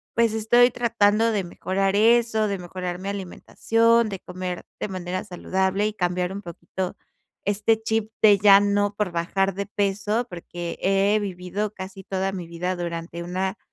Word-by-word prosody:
pues, 230 Hz, -2 st, +3 dB
estoy 240 Hz, +3 st, +5 dB
tratando 225 Hz, -2 st, +2 dB
de 200 Hz, -3 st, 0 dB
mejorar 195 Hz, +2 st, -1 dB
eso, 225 Hz, 0 st, +4 dB
de 200 Hz, -1 st, -2 dB
mejorar 180 Hz, 0 st, -5 dB
mi 195 Hz, +1 st, -4 dB
alimentación, 225 Hz, +4 st, +1 dB
de 195 Hz, -, -5 dB
comer 180 Hz, 0 st, -5 dB, 0.2 s
de -, -, -2 dB
manera 185 Hz, 0 st, -4 dB
saludable 190 Hz, +3 st, 0 dB
y 215 Hz, -, -3 dB
cambiar 180 Hz, -1 st, -1 dB
un 200 Hz, -, -6 dB
poquito 175 Hz, +2 st, -5 dB, 0.5 s
este 210 Hz, +2 st, +1 dB
chip 220 Hz, -1 st, -1 dB
de 205 Hz, -2 st, +7 dB
ya 200 Hz, 0 st, +8 dB
no, 205 Hz, 0 st, +1 dB
por 205 Hz, -4 st, -1 dB
bajar 190 Hz, +3 st, 0 dB
de 200 Hz, +1 st, -3 dB
peso. 205 Hz, +3 st, -1 dB
Porque 175 Hz, 0 st, -6 dB
he 195 Hz, +2 st, +3 dB
vivido 195 Hz, +1 st, -4 dB
casi 190 Hz, +1 st, -8 dB
toda 190 Hz, 0 st, -2 dB
mi 180 Hz, -3 st, -6 dB
vida 175 Hz, +2 st, -3 dB
durante 170 Hz, 0 st, -5 dB
una 185 Hz, +2 st, -2 dB
195 Hz, 160 wpm, -24 LUFS, 180-210 Hz, 0.5 s, ya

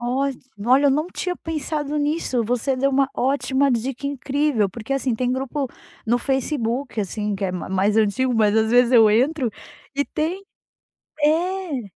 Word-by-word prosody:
Olhe 260 Hz, +3 st, -1 dB, 0.3 s
olha, 260 Hz, +4 st, +4 dB
eu -, -, +5 dB
não 305 Hz, +5 st, 0 dB
tinha 360 Hz, -1 st, -2 dB
pensado 300 Hz, -2 st, -3 dB
nisso, 290 Hz, -5 st, 0 dB
você 245 Hz, +4 st, 0 dB
deu 275 Hz, +2 st, +2 dB
uma 275 Hz, 0 st, +2 dB
ótima 275 Hz, +1 st, +1 dB
dica 255 Hz, +3 st, -2 dB
incrível, 280 Hz, -5 st, 0 dB
porque 230 Hz, +6 st, -6 dB
assim, 270 Hz, -2 st, 0 dB
tem 250 Hz, +2 st, 0 dB
grupo 270 Hz, +1 st, -2 dB, 0.4 s
no 240 Hz, +2 st, +2 dB
Facebook 265 Hz, -2 st, -1 dB
assim, 210 Hz, +1 st, -2 dB
que 195 Hz, 0 st, -3 dB
é 190 Hz, -, 0 dB
ma 180 Hz, -2 st, -5 dB
mais 195 Hz, +3 st, +1 dB
antigo, 225 Hz, +4 st, +2 dB
mas 215 Hz, -1 st, +3 dB
às 220 Hz, 0 st, +2 dB
vezes 245 Hz, +1 st, +4 dB
eu 225 Hz, -3 st, +7 dB
entro 255 Hz, +3 st, +2 dB, 0.5 s
e 285 Hz, -, +2 dB
tem 345 Hz, +6 st, -3 dB, 0.8 s
eh, 335 Hz, -2 st, +1 dB
260 Hz, 165 wpm, -22 LUFS, 230-285 Hz, 0.8 s, eu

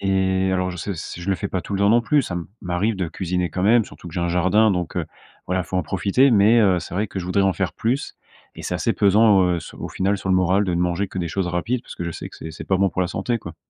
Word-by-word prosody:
et 95 Hz, -1 st, +1 dB
alors 90 Hz, 0 st, 0 dB
je 90 Hz, -, -7 dB
sais 100 Hz, +3 st, -4 dB
s 85 Hz, -, -7 dB
je 85 Hz, +2 st, -6 dB
le -, -, +3 dB
fais 100 Hz, -, -4 dB
pas 95 Hz, -, -2 dB
tout -, -, -8 dB
le 100 Hz, -, -1 dB
temps 100 Hz, -, +4 dB
non 120 Hz, +2 st, +5 dB
plus. 145 Hz, +4 st, +2 dB
Ça 90 Hz, -7 st, -4 dB, 0.3 s
m'arrive 95 Hz, +4 st, -1 dB
de 90 Hz, -3 st, -2 dB
cuisiner 90 Hz, 0 st, -2 dB
quand 90 Hz, +3 st, -3 dB
même, 115 Hz, +2 st, +4 dB
surtout 90 Hz, -, -12 dB
que 80 Hz, -, -12 dB
j'ai 90 Hz, -, -1 dB
un 85 Hz, -, 0 dB
jardin 95 Hz, +5 st, +3 dB
donc 90 Hz, -3 st, -2 dB
heu, -, -, -1 dB, 0.4 s
voilà, 90 Hz, 0 st, 0 dB
faut 95 Hz, +2 st, -4 dB
en -, -, 0 dB
profiter 100 Hz, -, +2 dB
mais 110 Hz, +2 st, +5 dB
heu, 95 Hz, -4 st, +4 dB
c'est 85 Hz, -, -8 dB
vrai 105 Hz, +3 st, 0 dB
que -, -, -5 dB
je 90 Hz, -, -4 dB
voudrais 100 Hz, +2 st, +1 dB
en 95 Hz, -, +3 dB
faire 95 Hz, +1 st, -2 dB
plus 125 Hz, +5 st, -2 dB, 0.4 s
et -, -, -8 dB
c'est -, -, -3 dB
assez -, -, 0 dB
pesant, 100 Hz, 0 st, +5 dB
heu, 90 Hz, -1 st, +1 dB
s -, -, -10 dB
au -, -, -6 dB
final, 100 Hz, +2 st, 0 dB
sur 95 Hz, -, -5 dB
le -, -, +4 dB
moral 95 Hz, +2 st, +2 dB
de 90 Hz, -3 st, -1 dB
ne 85 Hz, -, 0 dB
manger 90 Hz, +2 st, 0 dB
que -, -, -6 dB
des 85 Hz, -2 st, -2 dB
choses 95 Hz, +2 st, -2 dB
rapides 110 Hz, +8 st, -1 dB
parce -, -, -10 dB
que 85 Hz, -, -4 dB
je 85 Hz, -, -3 dB
sais -, -, -7 dB
que -, -, -14 dB
c'est 80 Hz, -, -8 dB
c'est 80 Hz, -, -8 dB
pas 95 Hz, -, +3 dB
bon 100 Hz, 0 st, +3 dB
pour 95 Hz, -, -3 dB
la 90 Hz, -, -1 dB
santé, 115 Hz, +5 st, -2 dB
quoi. 85 Hz, -6 st, -10 dB
95 Hz, 315 wpm, -22 LUFS, 90-100 Hz, 0.4 s, non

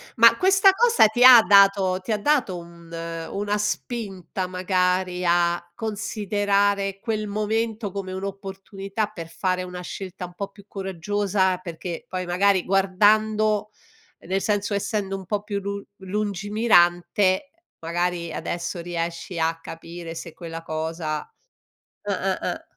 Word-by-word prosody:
Ma 230 Hz, 0 st, +7 dB
questa 385 Hz, +3 st, +5 dB
cosa 470 Hz, -, +5 dB
ti 240 Hz, +3 st, +1 dB
ha 250 Hz, -2 st, +11 dB
dato 195 Hz, -1 st, +5 dB
ti 230 Hz, -, -4 dB
ha 215 Hz, -, +2 dB
dato 230 Hz, -7 st, +1 dB
un 170 Hz, -1 st, -13 dB
una 165 Hz, +5 st, -3 dB
spinta 200 Hz, -4 st, -3 dB
magari 180 Hz, 0 st, 0 dB
a 175 Hz, 0 st, +2 dB
considerare 205 Hz, -2 st, 0 dB
quel 215 Hz, -1 st, -2 dB
momento 215 Hz, +1 st, -2 dB
come 190 Hz, -1 st, -5 dB
un'opportunità 195 Hz, +1 st, -5 dB
per 165 Hz, -4 st, -7 dB
fare 185 Hz, +2 st, -1 dB
una 180 Hz, 0 st, -6 dB
scelta 185 Hz, 0 st, -7 dB
un 175 Hz, -, -12 dB
po' 200 Hz, +2 st, -4 dB
più 200 Hz, 0 st, -17 dB
coraggiosa, 190 Hz, 0 st, -1 dB
perché 170 Hz, -1 st, -7 dB
poi 185 Hz, -1 st, -4 dB
magari 185 Hz, +1 st, +2 dB
guardando 210 Hz, +2 st, +2 dB, 0.5 s
nel 190 Hz, +2 st, -2 dB
senso 205 Hz, -1 st, 0 dB
essendo 200 Hz, -1 st, -2 dB
un 190 Hz, -, -9 dB
po' 205 Hz, +2 st, -2 dB
più 205 Hz, -1 st, -3 dB
lu 200 Hz, 0 st, -4 dB, 0.2 s
lungimirante, 200 Hz, -, +2 dB, 0.3 s
magari 170 Hz, 0 st, -2 dB
adesso 170 Hz, +1 st, -4 dB
riesci 170 Hz, +1 st, -4 dB
a 165 Hz, 0 st, 0 dB
capire 165 Hz, 0 st, -8 dB
se 165 Hz, 0 st, -8 dB
quella 165 Hz, 0 st, -7 dB
cosa 160 Hz, -1 st, -3 dB, 0.8 s
ah-ah, -, -, -1 dB
ah. -, -, -4 dB
195 Hz, 130 wpm, -24 LUFS, 175-210 Hz, 0.8 s, ha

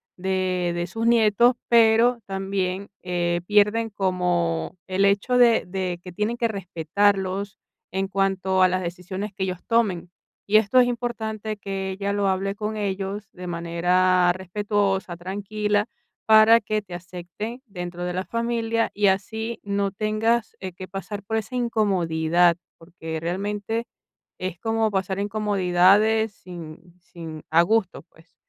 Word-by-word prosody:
de 185 Hz, -1 st, -1 dB
de 175 Hz, 0 st, -2 dB
sus 225 Hz, +5 st, -4 dB
nietos, 235 Hz, +1 st, +4 dB
pero, 235 Hz, +1 st, +5 dB
también, 195 Hz, 0 st, -3 dB
eh, 175 Hz, -1 st, -1 dB
pierden 210 Hz, +2 st, +3 dB
como 180 Hz, -, -1 dB
el 190 Hz, +1 st, +1 dB
hecho 200 Hz, +5 st, +2 dB
de 235 Hz, -4 st, +5 dB
de 180 Hz, -2 st, -3 dB
que 180 Hz, -1 st, -10 dB
tienen 215 Hz, +5 st, -1 dB
que 235 Hz, -, +1 dB
respetarlos, 195 Hz, +1 st, -1 dB, 0.3 s
en 190 Hz, 0 st, -1 dB
cuanto 190 Hz, -1 st, 0 dB
a 185 Hz, -, +6 dB
las 185 Hz, +1 st, -1 dB
decisiones 185 Hz, +4 st, -5 dB
que 190 Hz, 0 st, -3 dB
ellos 185 Hz, -1 st, -3 dB
tomen. 205 Hz, -7 st, +1 dB, 0.4 s
Y 215 Hz, +1 st, +5 dB
esto 220 Hz, +4 st, +4 dB
es 245 Hz, -, +5 dB
importante, 220 Hz, -3 st, -3 dB
que 195 Hz, -1 st, -4 dB
ella 200 Hz, +1 st, -2 dB
lo 200 Hz, -1 st, +1 dB
hable 195 Hz, +1 st, -1 dB
con 215 Hz, +1 st, -3 dB
ellos, 200 Hz, 0 st, -3 dB
de 180 Hz, 0 st, -8 dB
manera 175 Hz, +1 st, +2 dB
respetuosa, 195 Hz, 0 st, -1 dB
tranquila, 205 Hz, +3 st, -1 dB, 0.4 s
para 220 Hz, +1 st, +7 dB
que 215 Hz, 0 st, -1 dB
te 185 Hz, -3 st, -12 dB
acepten 180 Hz, +7 st, -7 dB
dentro 175 Hz, -3 st, -6 dB
de 180 Hz, -, -2 dB
la 185 Hz, +1 st, -2 dB
familia, 230 Hz, +1 st, -1 dB
y 205 Hz, -1 st, +2 dB
así 220 Hz, +4 st, -1 dB
no 200 Hz, -1 st, -1 dB
tengas, 215 Hz, +3 st, 0 dB
eh, 190 Hz, -1 st, -5 dB
que 185 Hz, +1 st, -9 dB
pasar 195 Hz, +2 st, -6 dB
por 220 Hz, +2 st, -3 dB
esa 220 Hz, +4 st, -4 dB
incomodidad. 175 Hz, -7 st, +2 dB, 0.2 s
Porque 165 Hz, -1 st, -7 dB
realmente, 205 Hz, +6 st, -3 dB, 0.5 s
es 185 Hz, -2 st, -4 dB
como 225 Hz, 0 st, +1 dB
pasar 190 Hz, 0 st, -1 dB
incomodidades, 205 Hz, +1 st, +3 dB
sin 175 Hz, -1 st, -11 dB
sin 165 Hz, -3 st, -9 dB
a 165 Hz, +1 st, +5 dB
gusto, 215 Hz, -1 st, 0 dB
pues, 160 Hz, +1 st, -24 dB
195 Hz, 145 wpm, -24 LUFS, 180-215 Hz, 0.5 s, para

